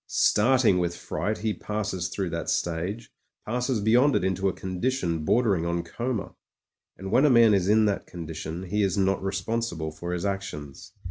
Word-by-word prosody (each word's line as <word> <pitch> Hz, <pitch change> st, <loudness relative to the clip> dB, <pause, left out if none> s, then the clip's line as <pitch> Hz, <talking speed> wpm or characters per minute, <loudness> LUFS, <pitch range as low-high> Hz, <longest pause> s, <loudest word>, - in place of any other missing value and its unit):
Start 125 Hz, +4 st, +3 dB
ing 90 Hz, -4 st, +5 dB
with 85 Hz, -1 st, -1 dB
fright 105 Hz, +1 st, -3 dB
he 110 Hz, 0 st, -1 dB
passes 105 Hz, -5 st, -3 dB
through 95 Hz, -1 st, -3 dB
that 85 Hz, -1 st, -3 dB
stage, 90 Hz, +7 st, -2 dB, 0.3 s
passes 125 Hz, +1 st, -1 dB
beyond 125 Hz, +7 st, +4 dB
it -, -, +1 dB
into 95 Hz, +1 st, +1 dB
a -, -, -3 dB
condition 90 Hz, -3 st, -2 dB
bordering 100 Hz, -1 st, +2 dB
on 85 Hz, 0 st, -1 dB
coma; 120 Hz, -4 st, -4 dB, 0.6 s
and 95 Hz, 0 st, -6 dB
when 130 Hz, +5 st, +4 dB
a 150 Hz, -, +6 dB
man 115 Hz, -4 st, +6 dB
is 95 Hz, -2 st, +2 dB
in 110 Hz, +1 st, +5 dB
that 100 Hz, -1 st, -1 dB
condition 80 Hz, 0 st, -6 dB
he 105 Hz, +3 st, -1 dB
is 100 Hz, 0 st, +1 dB
not 95 Hz, 0 st, +1 dB
responsible 95 Hz, -4 st, -2 dB
for 85 Hz, +3 st, -6 dB
his 90 Hz, +1 st, -2 dB
actions. 75 Hz, -8 st, -5 dB
95 Hz, 180 wpm, -26 LUFS, 85-110 Hz, 0.6 s, a